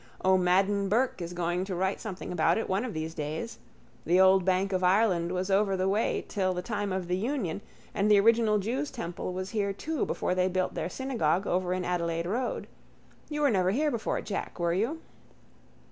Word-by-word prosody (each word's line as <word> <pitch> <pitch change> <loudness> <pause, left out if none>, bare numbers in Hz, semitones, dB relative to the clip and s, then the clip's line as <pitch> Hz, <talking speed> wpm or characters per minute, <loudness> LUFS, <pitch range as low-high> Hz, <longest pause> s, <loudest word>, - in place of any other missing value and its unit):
O'Madden 190 +2 +3
Burke 235 -1 +1
is 170 0 -4
going 175 +1 -1
to 190 -2 -4
write 190 +2 -1
something 195 -6 -6
about 165 -1 +2
it 225 - -2
one 190 +4 0
of 250 -9 -5
these 160 +1 -3
days. 155 +8 -5 0.4
The 180 +2 +3
old 190 0 +6
bank 190 +1 +1
of 185 0 0
Ireland 180 -2 +3
was 185 +1 -2
over 195 0 +2
the 185 +1 0
way 205 +4 0
till 185 -3 -1
the 180 - -3
time 205 -1 -2
of 185 -1 -2
the 180 - 0
union 205 - -2 0.3
and 210 0 +1
the 205 -1 +7
original 225 0 +4
jews' 250 +9 -2
temple 175 -7 -5
was 185 +1 -5
here 200 -3 0
too 310 +9 -2
before - - -1
they 185 0 +2
built 185 0 -1
their - - -3
synagogue 205 - 0
over 180 -1 0
in 185 0 -1
Adelaide 170 -1 -1
road. 240 +8 -2 0.6
You 295 -1 -3
were 285 -3 +4
never 185 -3 +2
here 295 +9 +1
before, 230 -4 -2
Jack, 200 -2 -5
were 170 -1 +1
you? 235 - -1
190 Hz, 200 wpm, -28 LUFS, 180-215 Hz, 0.6 s, the